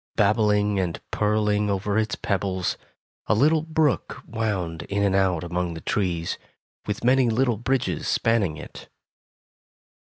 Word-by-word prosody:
Babbling 105 -1 +2
and 90 -3 -2
purling 105 -1 +1
over 100 +1 -1
its 110 -1 +1
pebbles, 95 -2 -1 0.5
a - - +3
little 150 +7 +4
brook 160 -3 0
wound 100 -8 -2
in 100 0 0
and 100 -1 +2
out 95 -4 +2
among 85 0 -2
the - - -6
trees, 85 -5 -1 0.5
with 105 +1 -3
many 125 0 +4
little 120 0 +1
bridges 120 - -1
spanning 105 -9 +1
it. - - -11
105 Hz, 130 wpm, -24 LUFS, 95-115 Hz, 0.5 s, little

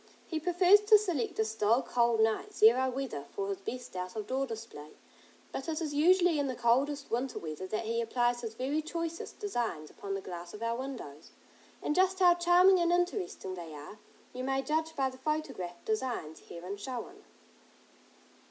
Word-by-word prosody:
He 320 - -3
prefers 360 +4 +5
to 425 +1 +7
select 355 - -2
a 220 - +2
still, 220 +3 +2
cold 235 -2 +2
night, 220 0 0
zero 250 +4 +5
weather, 250 - -4
for 200 0 -3
his 195 -1 -3
best 245 +2 -7
out 180 +1 -5
of 215 -2 -3
door 270 +4 -1
display, 225 -10 -8 0.6
but 270 - -5
it 315 0 -1
is 310 -3 -3
usually 345 +1 +4
in 285 - 0
the 260 - -3
coldest 275 +5 +1
winter 250 +3 -1
weather 160 +3 -5
that 215 +3 -3
he 230 +1 0
applies 240 +1 0
his 225 -2 -6
very 275 +6 -1
choicest 335 +1 -5
designs 235 - -3
upon 195 -1 -5
the - - -2
glass 175 0 -8
of 215 - -7
our 230 0 0
windows, 240 - -7 0.5
and - - +1
just 375 +2 +3
how 360 -2 +6
charming 355 +2 +5
and 340 0 +2
interesting 355 - -1
they 170 -4 -8
are, 150 +9 -10 0.3
you 255 +1 -5
may 270 +1 0
judge 320 +2 -1
by 270 -1 +1
the 260 0 -8
photographed 265 - -3
designs 250 - -2
herein 180 +4 -7
shown. 260 - -7
255 Hz, 180 wpm, -31 LUFS, 215-320 Hz, 0.6 s, to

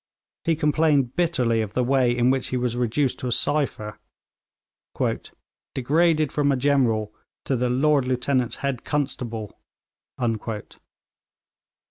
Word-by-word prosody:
He 165 - +3
complained 150 -4 +2
bitterly 125 -10 +1
of 105 -2 -4
the 125 - +1
way 130 -1 +3
in 125 +1 +4
which 135 -1 -1
he 130 - -2
was 125 -1 -1
reduced 125 +3 0
to 125 - -3
a - - -1
cypher 135 -6 -1 1.8
'degraded 155 +3 +2
from 145 -1 +2
a - - +2
general 125 -6 +1 0.3
to 135 - +1
the 125 0 0
"Lord 135 +1 +2
Lieutenant's 125 -1 0
head 135 -3 -2
constable."' 120 -7 -3
130 Hz, 120 wpm, -24 LUFS, 120-145 Hz, 1.8 s, in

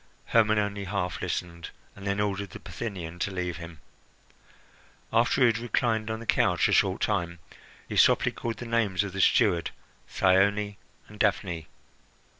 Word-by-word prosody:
Hermon 110 -1 +3
only 100 -1 -1
half 95 -1 -3
listened, 85 -2 -4 0.3
and 100 0 -8
then 100 +1 0
ordered 100 -1 -1
the - - -10
Bithynian 90 -7 -6
to 95 - -1
leave 90 -2 -3
him. 85 -2 -10 1.3
After 120 +3 +3
he - - +7
had 115 -1 +2
reclined 115 -2 0
on 110 0 -3
the 115 - -9
couch - - +2
a - - -1
short 95 -1 +2
time, 85 -5 -1 0.5
he - - -4
softly - - +5
called 115 -1 -5
the 120 - -7
names 110 -5 +1
of 100 -3 -6
the 95 - -1
steward, 85 -3 +3 0.4
Thyone, 100 +2 +2 0.3
and - - -14
Daphne. 80 -3 0
100 Hz, 160 wpm, -27 LUFS, 90-110 Hz, 1.3 s, he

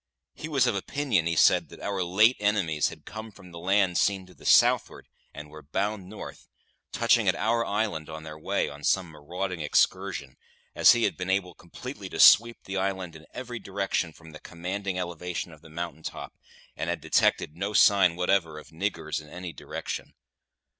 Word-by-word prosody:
He 155 - -7
was 135 -5 +3
of 120 - +2
opinion, 100 - 0
he 85 - 0
said, - - +4
that - - -13
our 100 -2 -3
late 105 +8 +4
enemies 95 -8 +1
had - - -13
come 110 +1 -8
from 95 -3 -15
the 85 - -9
land 95 0 +2
seen 95 -2 +1
to 90 - -17
the - - -10
southward - - +4 0.2
and 75 0 -10
were 75 0 -11
bound 95 +6 -3
north, 105 - -10 0.4
touching - - +3
at - - +4
our 115 +2 +1
island 100 -8 -2
on 80 0 -7
their 75 -1 -9
way, - - -1
on 70 +1 -10
some 95 +1 +1
marauding 90 +4 -5
excursion, 75 - 0 0.4
as - - +7
he 120 -1 0
had - - +1
been 90 0 -4
able 95 -2 0
completely 100 +4 -9
to - - -7
sweep 115 +1 +7
the 95 0 -5
island 95 -3 -2
in 80 0 -14
every 125 -2 -6
direction 95 -4 -2
from 80 0 -15
the 75 - -11
commanding 95 +2 -4
elevation 90 0 -4
of 80 -2 -15
the 80 - -15
mountain 85 0 -6
top, - - -7 0.4
and - - -3
had - - -1
detected 75 - +1
no 100 +4 -3
sign 100 -4 +5
whatever 90 -3 +1
of 75 - -11
"niggers" 95 0 -3
in 75 - -15
any 90 +1 -7
direction. - - -6
90 Hz, 190 wpm, -27 LUFS, 85-100 Hz, 0.4 s, as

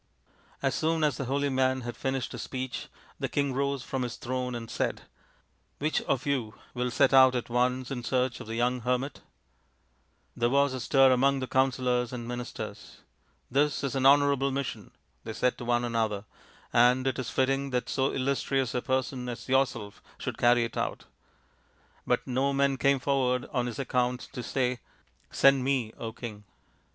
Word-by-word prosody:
As - - +2
soon 160 0 0
as 145 -5 +2
the 135 - -3
holy 140 +2 0
man 130 0 +1
had 120 -1 -5
finished 130 0 -2
his - - -6
speech 130 -1 -5 0.3
the - - -2
king 140 -2 0
rose 140 -1 -1
from 135 +1 -3
his 125 -1 -3
throne 125 0 -3
and 115 -1 -6
said, - - -2 0.4
" - - -43
Which 155 +2 0
of 130 -2 -1
you 130 -7 -1 0.2
will 125 0 -1
set 120 - +3
out 130 -1 +7
at 120 -1 -3
once 125 +1 +1
in 125 -3 -4
search 125 0 0
of - - -9
the 115 - -4
young 125 +2 +1
hermit? 125 +3 -2 0.6
" - - -42
There 120 0 +1
was 140 +1 +3
a 130 - -3
stir 135 +2 +5
among 135 +2 +3
the 130 - -2
counsellors 125 -2 +1
and 120 -2 -6
ministers. 120 0 -7 0.2
" - - -40
This 145 +3 +1
is 140 - -1
an 135 -1 +3
honourable 140 -1 +4
mission," 130 -7 -4 0.3
they - - -5
said 125 0 0
one 120 0 +1
to - - -1
another, 110 -3 -1 0.3
" - - -28
and 125 +2 +5
it 130 0 0
is 125 -1 -3
fitting 135 +2 +1
that 125 -1 -1
so 135 0 +1
illustrious 135 -1 0
a 125 - 0
person 130 0 -1
as 120 - -7
yourself 130 -6 0 0.2
should - - -5
carry 120 0 +5
it 115 - -5
out." - - -3 1.0
But - - +1
no 135 +2 0
man 140 0 +2
came 140 +1 +3
forward 130 -2 0
on 125 -2 0
his 120 - -5
own 135 - -1
account 125 0 0
to 125 - -4
say, 125 0 -1 0.2
" - - -37
Send 135 -1 +4
me, 130 -5 0 0.2
King 105 -4 -7
130 Hz, 190 wpm, -28 LUFS, 120-135 Hz, 1.0 s, out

